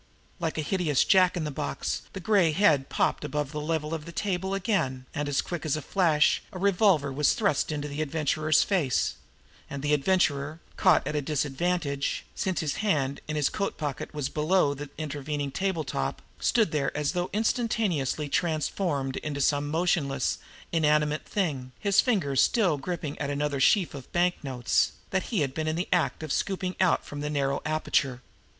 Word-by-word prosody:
Like 165 -2 -2
a 155 - 0
hideous 160 -4 +2
jack 185 -1 +4
in 170 - -1
the 150 - -3
box 145 +1 -3
the 195 - -5
gray 185 -4 +3
head 150 -7 +3
popped - - 0
above 150 -1 -2
the 150 -1 -4
level 155 0 -2
of 155 -2 -4
the 170 - -8
table 190 +1 -1
again, 155 - -1
and 145 -1 0
quick 175 -3 -5
as 155 -1 0
a - - -4
flash, 165 -6 +3
a - - -7
revolver 180 -7 +3
was 145 +1 +3
thrust 195 -8 +1
into 150 -1 -3
the 145 +1 -4
Adventurer's 155 0 +2
face; 165 -11 +1 0.6
and 140 0 -6
the 150 0 +2
Adventurer, 150 -1 +1 0.2
caught - - +4
at 150 - -3
a 150 - +1
disadvantage, 145 +1 -1
since 185 -2 -1
his 150 -3 -2
hand 145 -10 0
in 155 - -3
his 150 -2 +2
coat 200 - -2
pocket 145 -4 -4
was 145 -3 -2
below 155 0 +2
the 145 0 -7
intervening 145 -1 -3
table 190 -1 -1
top, 70 - -3 0.2
stood 220 -8 +2
there 140 -3 0
as 150 -1 0
though 180 0 -2
instantaneously 210 - 0
transformed 155 -3 -1
into 145 -2 -4
some 145 +1 +2
motionless, 150 -5 0 0.3
inanimate 150 -2 +2
thing, 140 -10 -2
his 200 -1 +3
fingers 165 - +1
still 185 -11 +2
gripping 160 -2 -4
at 140 - -2
another 145 0 -1
sheaf 180 +6 +3
of 135 -3 -9
banknotes 145 -8 +1 0.2
that 190 -1 0
he 220 -8 0
had 135 -2 -1
been 155 +1 -2
in 155 - 0
the 175 +3 -2
act 175 -2 0
of 155 - -4
scooping 185 -1 -1
out 185 -2 +3
from 145 0 -6
the 150 - -2
narrow 140 -2 0
aperture. 140 -4 0
155 Hz, 180 wpm, -27 LUFS, 145-180 Hz, 0.6 s, jack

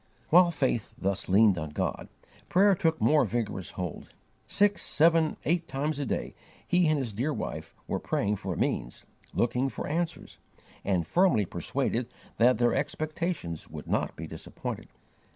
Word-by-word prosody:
While 175 +2 +7
faith 130 -8 -1
thus 100 0 -1
leaned 100 -1 +5
on 80 -1 -4
God, 75 - -3 0.4
prayer 195 +2 +5
took 165 -3 +1
more 150 -1 +4
vigorous 110 -5 -2
hold. 90 -4 -5 0.4
Six, 205 0 +2
seven, 160 +1 +3
eight 170 +1 +1
times 145 0 -2
a 140 - -2
day, - - -2 0.3
he 180 -1 +3
and 155 0 +3
his 125 -6 -3
dear 130 +9 -1
wife - - -5
were - - -1
praying 105 +1 0
for 95 -3 -4
means, - - -2 0.3
looking 125 +3 +1
for 115 - -5
answers, 165 +2 -3 0.4
and 90 -4 +1
firmly 170 - +3
persuaded 120 +7 -2 0.3
that 120 0 +5
their 120 +1 +3
expectations 155 - -3
would - - -8
not - - -1
be 80 - -6
disappointed. 80 0 -7
130 Hz, 150 wpm, -28 LUFS, 100-160 Hz, 0.4 s, While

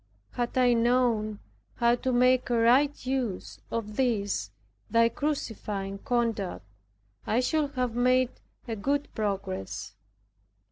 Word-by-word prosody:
Had 240 +1 -3
I 250 -1 +5
known 230 -3 +2 0.4
how 235 0 +3
to 255 +2 -1
make 250 +1 +3
a 240 - +2
right 255 +5 +3
use 255 -7 -3
of 215 -2 -4
this 205 - 0 0.4
thy 230 0 +4
crucifying 215 -8 -3
conduct, 225 - -1 0.6
I 225 - +2
should 290 +2 0
have 250 -2 0
made 255 +1 +3 0.4
a 225 - -2
good 280 +7 -1
progress. 195 - -3
240 Hz, 120 wpm, -28 LUFS, 215-255 Hz, 0.6 s, I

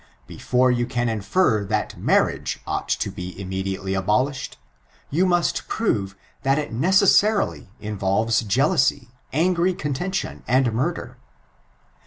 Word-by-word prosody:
Before 125 - +1
you 120 -1 0
can 120 -1 -1
infer, 110 - +1
that - - -2
marriage - - +1
ought - - -3
to - - -1
be 90 +1 -8
immediately 95 0 -3
abolished, 125 +9 -1 0.5
you 175 +6 +2
must 175 -1 +1
prove 100 - -1 0.3
that 135 +1 +2
it 150 -5 -3
neeasarily 190 - +3
involves 105 +2 0
jealousy, 130 - +1 0.2
angry 175 +3 +2
contention, 175 +7 -3
and 125 -2 +2
murder. 145 +10 -2
125 Hz, 115 wpm, -23 LUFS, 105-170 Hz, 0.5 s, neeasarily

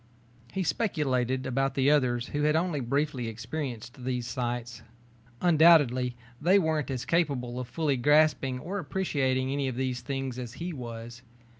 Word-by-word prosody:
He 190 - -1
speculated 130 - 0
about 135 +1 0
the 135 +1 +3
others 125 -4 +1
who 145 - -2
had 150 +1 +3
only 165 -2 0
briefly 135 0 -1
experienced 120 +1 -6
these 125 -1 -2
sights. 120 -1 -4 0.6
Undoubtedly 150 -8 +5 0.3
they 180 +6 +5
weren't 160 -7 0
as 130 -1 -3
capable 130 -7 0
of 125 - -5
fully 140 +2 0
grasping 145 -1 +3
or 185 +10 -4
appreciating 135 -6 0
any 140 -1 -1
of 130 - -3
these 130 -1 -2
things 135 0 -4
as 120 -2 -6
he 175 +1 -5
was. 120 -2 -8
130 Hz, 150 wpm, -28 LUFS, 125-150 Hz, 0.6 s, Undoubtedly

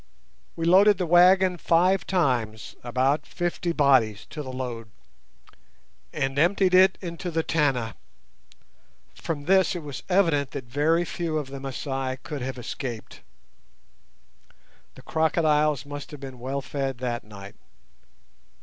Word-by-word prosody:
We 165 - -3
loaded 195 +4 +6
the 180 - -1
wagon 180 +2 +5
five 180 +3 +2
times, 125 - -1
about 130 +5 0
fifty 175 0 -2
bodies 130 -10 +2
to 155 - -5
the 130 -3 -7
load, 120 -4 -6 1.2
and 135 +1 -2
emptied 185 +3 +3
it 190 +1 +6
into 175 0 -5
the 160 -1 -1
Tana. 135 -9 0 1.2
From 145 -3 -5
this 190 +1 +3
it 170 - -5
was 145 -2 -7
evident 165 -8 +2
that 135 - -6
very 150 +8 +1
few 165 -1 -3
of 145 -3 -4
the 140 - -6
Masai 135 -1 -4
could 150 -4 -6
have 130 +1 -4
escaped. 120 -1 -7 1.7
The - - -14
crocodiles 155 -3 +1
must 145 0 -8
have 150 - -10
been 130 -2 -9
well 135 +3 -3
fed 135 -1 -3
that 120 -1 -3
night. 100 -1 -11
145 Hz, 130 wpm, -25 LUFS, 130-170 Hz, 1.7 s, loaded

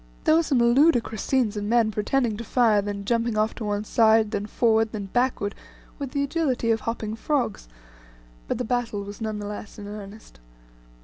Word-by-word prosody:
There - - +4
were 325 - +5
some 290 -5 0
ludicrous 235 -2 +3
scenes 245 -6 +1
of 205 - -3
men 225 +1 +2
pretending 225 +2 0
to 235 - -5
fire, 225 -4 +3
then 200 0 -5
jumping 230 0 0
off 215 +1 +1
to 230 - -7
one 205 0 -1
side, 220 -1 +3
then 205 0 -2
forward, 225 -1 +2
then 200 -3 -5
backward, 245 -5 0 0.5
with 280 -2 -4
the 280 +2 -1
agility 280 -6 0
of 225 - +1
hopping 220 -2 -4
frogs, 235 - -2 0.8
but - - -1
the 250 - -2
battle 230 -4 -1
was 205 +2 -9
none 215 -1 -2
the 205 - -5
less 205 0 -7
in 205 -1 -8
earnest. 205 - -10
225 Hz, 190 wpm, -25 LUFS, 210-245 Hz, 0.8 s, were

